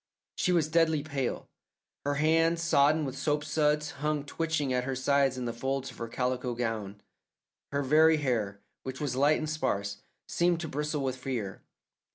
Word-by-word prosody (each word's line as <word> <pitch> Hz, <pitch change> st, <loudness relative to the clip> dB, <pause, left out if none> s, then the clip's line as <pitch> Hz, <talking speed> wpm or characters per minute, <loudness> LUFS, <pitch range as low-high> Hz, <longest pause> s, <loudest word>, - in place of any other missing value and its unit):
She 180 Hz, -, +1 dB
was 170 Hz, -4 st, +3 dB
deadly 160 Hz, -2 st, +2 dB
pale. 140 Hz, -5 st, -3 dB, 0.6 s
Her 145 Hz, -, +1 dB
hands, 165 Hz, +3 st, +2 dB
sodden 150 Hz, -1 st, +4 dB
with 135 Hz, -1 st, -4 dB
soapsuds, 150 Hz, +1 st, +1 dB
hung 150 Hz, 0 st, -1 dB
twitching 155 Hz, -3 st, -1 dB
at 125 Hz, 0 st, +1 dB
her 135 Hz, +1 st, -2 dB
sides 135 Hz, 0 st, +2 dB
in 125 Hz, -, -3 dB
the 120 Hz, -, -2 dB
folds 135 Hz, +3 st, -2 dB
of -, -, -15 dB
her 115 Hz, -, -3 dB
calico 125 Hz, 0 st, -2 dB
gown; 110 Hz, -4 st, -3 dB, 0.7 s
her 140 Hz, 0 st, 0 dB
very 155 Hz, +3 st, +5 dB
hair, 110 Hz, -8 st, -1 dB, 0.2 s
which 130 Hz, 0 st, -6 dB
was 140 Hz, -4 st, -2 dB
light 145 Hz, +3 st, +4 dB
and 155 Hz, -, -3 dB
sparse, 100 Hz, -10 st, -1 dB, 0.3 s
seemed 175 Hz, -1 st, +1 dB
to 160 Hz, -, -4 dB
bristle 150 Hz, 0 st, -2 dB
with 130 Hz, -1 st, -2 dB
fear. 120 Hz, -7 st, -4 dB
140 Hz, 170 wpm, -29 LUFS, 125-155 Hz, 0.7 s, very